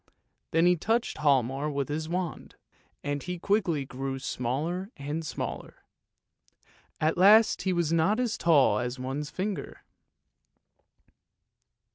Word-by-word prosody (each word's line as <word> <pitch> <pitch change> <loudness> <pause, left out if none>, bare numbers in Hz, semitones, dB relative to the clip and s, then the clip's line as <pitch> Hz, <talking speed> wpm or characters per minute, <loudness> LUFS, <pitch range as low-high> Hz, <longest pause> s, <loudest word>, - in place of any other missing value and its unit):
" - - -50
Then 165 +1 +3
he 180 0 +5
touched 225 +5 -1
Hialmar 140 0 +1
with 140 -2 -2
his 155 +2 -3
wand, 180 -1 -4 0.5
and 145 0 -2
he 180 +3 -5
quickly 175 -7 0
grew 135 +1 -4
smaller 145 - -3
and 145 +3 -4
smaller; 155 - -6 1.2
at 155 +3 +1
last 215 +4 +6
he 190 - 0
was 170 -3 0
not 165 +8 +2
as 245 -3 0
tall 140 -10 +4
as 125 +2 -3
one's 135 +3 -4
finger. 195 +2 -5
155 Hz, 125 wpm, -28 LUFS, 140-180 Hz, 1.2 s, last